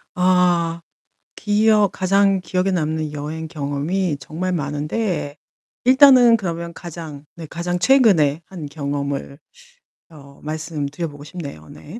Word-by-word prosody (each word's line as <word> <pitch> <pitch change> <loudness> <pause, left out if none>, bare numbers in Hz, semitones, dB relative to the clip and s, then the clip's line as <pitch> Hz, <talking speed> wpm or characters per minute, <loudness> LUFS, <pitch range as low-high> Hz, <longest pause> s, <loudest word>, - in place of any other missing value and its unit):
아. 175 -2 +2 0.6
기억 210 -1 +3
가장 195 +1 +2
기억에 185 +2 -1
남는 155 -3 -1
여행 155 +2 -5
경험이 150 +3 -2
정말 170 +7 -4
많은데 150 +1 -2 0.5
일단은 255 -2 +7
그러면 170 -3 -5
가장 165 -4 -9
네 165 - -8
가장 170 +3 -3
최근에 180 - +4
한 175 -5 -8
경험을 140 -1 -4 0.7
어 140 -3 -15
말씀드려 155 0 -4
보고 145 0 -12
싶네요, 145 - -9
네. 185 +10 -11
165 Hz, 245 characters per minute, -20 LUFS, 150-185 Hz, 0.7 s, 일단은